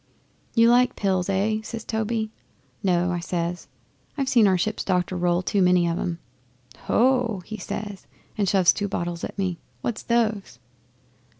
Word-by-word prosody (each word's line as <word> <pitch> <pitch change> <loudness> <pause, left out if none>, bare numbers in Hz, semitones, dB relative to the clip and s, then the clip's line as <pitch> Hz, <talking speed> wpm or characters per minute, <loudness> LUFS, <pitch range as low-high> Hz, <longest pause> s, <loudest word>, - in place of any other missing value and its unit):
'"You 230 0 +6
like 250 +1 +4
pills 190 -2 0
eh?" 205 +3 +1
says 225 +1 -6
Toby. 220 0 -2 0.5
"No," 180 -2 +2
I 175 - -1
says. 175 0 -3 0.5
"I've 275 -2 -1
seen 230 -5 +5
our 190 -1 +3
ship's 215 +5 -1
doctor 180 -1 0
roll 175 0 +1
too 200 +2 +1
many 180 -1 +4
of 170 0 -1
em." 170 -2 -2 0.7
'"Ho!" 240 -6 +2
he 215 - -6
says, 205 +1 -6 0.3
and 205 -3 0
he - - +2
shoves 190 -3 +5
two 205 - -2
bottles 175 -3 -3
at - - -5
me. 185 -4 -2 0.2
"What's 235 -3 -3
those?" 220 - 0
195 Hz, 165 wpm, -24 LUFS, 180-220 Hz, 0.7 s, You